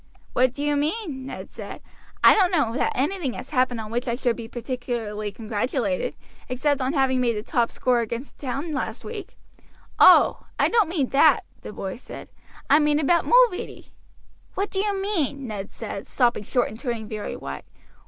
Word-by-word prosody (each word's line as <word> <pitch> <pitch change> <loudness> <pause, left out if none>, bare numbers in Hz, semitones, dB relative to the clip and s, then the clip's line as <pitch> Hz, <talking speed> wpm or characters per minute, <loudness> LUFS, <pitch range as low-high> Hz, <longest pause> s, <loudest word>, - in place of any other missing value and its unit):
"What 255 0 +3
do 285 - -4
you 295 0 +1
mean?" 295 - -2
Ned - - -8
said. - - -8 0.4
"I - - +9
don't 380 -4 +4
know 295 -11 +1
that 260 - +1
anything 285 0 -1
has - - -8
happened 255 -4 +1
on 215 -1 -6
which 245 +2 -2
I 235 - 0
should 245 -2 0
be 230 -2 -7
particularly 235 -4 -4
congratulated, 245 - -2 0.3
except 275 +2 0
on 260 +2 0
having 265 -3 +2
made 235 -2 +1
the 210 - -4
top 235 0 +1
score 250 -1 +1
against 235 +3 -5
the 280 - -7
town 280 +6 -3
last 245 -5 -3
week." 435 -3 -7 0.6
"Oh! - - +6
I - - +3
don't 445 -7 +3
mean 300 -7 0
that," 285 -1 +5 0.2
the - - -8
boy 195 -1 -5
said.. - - -10 0.4
"I 290 - +6
mean 295 -1 +3
about 330 +3 +2
Mulready." - - +3 0.7
"What 395 +2 -2
do 385 - -1
you 405 -1 0
mean?" 310 -9 -1
Ned 205 -4 -6
said, 220 +1 -6
stopping 240 -4 +1
short 245 +4 0
and 220 - -10
turning 235 -5 -3
very 215 -1 -5
white. 70 0 -7
260 Hz, 185 wpm, -24 LUFS, 235-300 Hz, 0.7 s, I